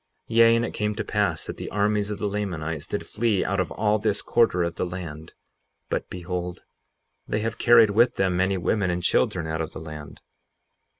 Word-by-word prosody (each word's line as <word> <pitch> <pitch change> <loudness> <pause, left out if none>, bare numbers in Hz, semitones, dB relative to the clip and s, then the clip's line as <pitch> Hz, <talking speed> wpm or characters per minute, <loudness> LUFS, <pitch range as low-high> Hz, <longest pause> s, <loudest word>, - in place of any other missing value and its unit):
58:30 - - -3
Yea, 115 0 +7
and 115 0 +1
it - - -6
came 105 -1 -1
to 110 - -2
pass 100 -7 -1
that - - -6
the - - -6
armies 105 0 +1
of 105 - -3
the 105 - -2
Lamanites 80 -7 -3
did 105 - -3
flee 110 -3 0
out 100 +1 -1
of 95 - 0
all 105 0 +1
this 105 -1 0
quarter 115 -7 +2
of 85 0 -2
the - - -3
land. 85 -4 -6 0.6
But - - -2
behold, 90 0 -5 0.6
they 105 - -1
have 115 +1 -3
carried 115 -3 +6
with 120 +4 +3
them 95 -2 +1
many 95 +2 +1
women 95 +2 0
and 90 0 -2
children - - +1
out 80 +1 -2
of 80 - -5
the - - -7
land. 75 -2 -9
100 Hz, 205 wpm, -25 LUFS, 85-105 Hz, 0.6 s, Yea